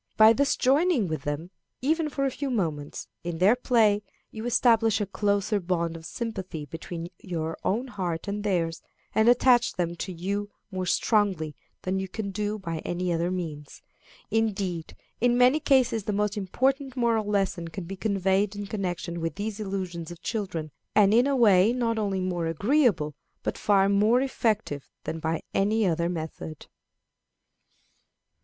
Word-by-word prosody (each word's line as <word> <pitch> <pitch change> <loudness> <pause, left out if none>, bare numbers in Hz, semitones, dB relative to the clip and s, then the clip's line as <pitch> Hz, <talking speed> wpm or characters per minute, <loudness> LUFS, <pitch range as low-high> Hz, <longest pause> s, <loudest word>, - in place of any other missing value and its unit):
By 220 +1 +8
thus 280 +3 +2
joining 275 - +3
with 155 -3 -3
them, 145 +5 -3 0.3
even 315 +2 +1
for 275 -1 -1
a 270 - +1
few 280 +2 -3
moments, 160 - -2 0.2
in 170 -1 -3
their 195 +7 +5
play, 225 -5 +3 0.3
you 220 +2 -5
establish 225 -3 +4
a 205 - 0
closer 200 +1 0
bond 170 -2 -1
of 160 -1 -8
sympathy 190 -10 -5
between 165 +2 -6
your 165 -3 -3
own 235 +7 0
heart 185 -6 -3
and 205 +1 -3
theirs, 170 -5 0 0.3
and 220 +2 +4
attach 245 0 +4
them 170 -1 -2
to 185 - -4
you 200 +4 -3 0.2
more 185 -1 -3
strongly 190 -8 +1 0.3
than 190 +1 -1
you 190 - -3
can 200 +1 -4
do 210 +2 -2
by 165 -5 -4
any 175 +1 -2
other 170 +1 0
means. 160 -6 -5 0.5
Indeed, 195 -7 -1 0.2
in 245 +1 +3
many 250 +5 +5
cases 250 -7 +2
the 210 - -1
most 210 +1 0
important 260 +7 0
moral 230 -3 +2
lessons 195 -5 0
can 185 +3 -6
be 190 +3 -6
conveyed 195 0 +1
in 205 0 -4
connection 180 -4 -3
with 165 0 -2
these 210 +1 -4
illusions 185 -5 -4
of 175 0 -11
children, 170 -8 -3 0.2
and 205 -1 +6
in 240 +4 +5
a 280 - +2
way 215 -3 +5
not 230 -3 0
only 195 -3 -1
more 175 -2 -1
agreeable 200 - +2 0.3
but - - -2
far 195 -2 +3
more 210 +5 +4
effective 220 - -1
than 160 - -4
by 160 0 -2
any 210 +2 +2
other 170 -1 +1
method. 160 -2 -6
200 Hz, 160 wpm, -27 LUFS, 170-225 Hz, 0.5 s, By